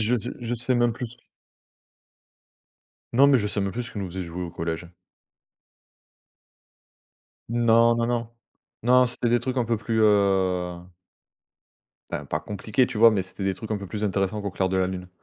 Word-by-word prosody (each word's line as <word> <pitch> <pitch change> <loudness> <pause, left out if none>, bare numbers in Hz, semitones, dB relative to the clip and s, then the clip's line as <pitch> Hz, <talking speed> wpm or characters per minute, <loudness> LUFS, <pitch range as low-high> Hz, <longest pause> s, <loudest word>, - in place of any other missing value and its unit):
je 110 +3 +2 0.3
je 120 0 -2
sais 125 +2 +2
même 120 -1 +2
plus. 120 0 -7 2.0
Non, 135 +4 +7
mais 140 -2 +5
je 105 - 0
sais 105 0 -2
même 100 0 -2
plus 120 - -3
ce - - -10
qu'ils 105 - -5
nous 95 - -3
faisaient 90 +1 -5
jouer 85 +2 -6
au 85 - -5
collège. 85 +1 -4 2.6
Non, 115 0 +4
non, 115 0 0
non. 120 -1 -1 0.5
Non, 125 +2 +5
c'était 120 0 -1
des 120 0 +3
trucs 130 0 -3
un 125 - +2
peu 115 0 0
plus 110 +1 -1
heu 95 -4 +2 1.3
enfin - - -4
pas - - -3
compliqué, 110 +4 0
tu 120 -4 -5
vois? 115 0 +8
Mais 100 -3 0
c'était 95 +1 -5
des 95 -1 0
trucs 110 - -8
un 110 - 0
peu 100 - -7
plus 105 +2 -4
intéressants 100 +1 -1
qu'Au 100 - -3
clair 95 +1 -1
de 95 - -1
la 95 -1 +2
lune. 90 -1 -6
110 Hz, 185 wpm, -25 LUFS, 95-120 Hz, 2.6 s, vois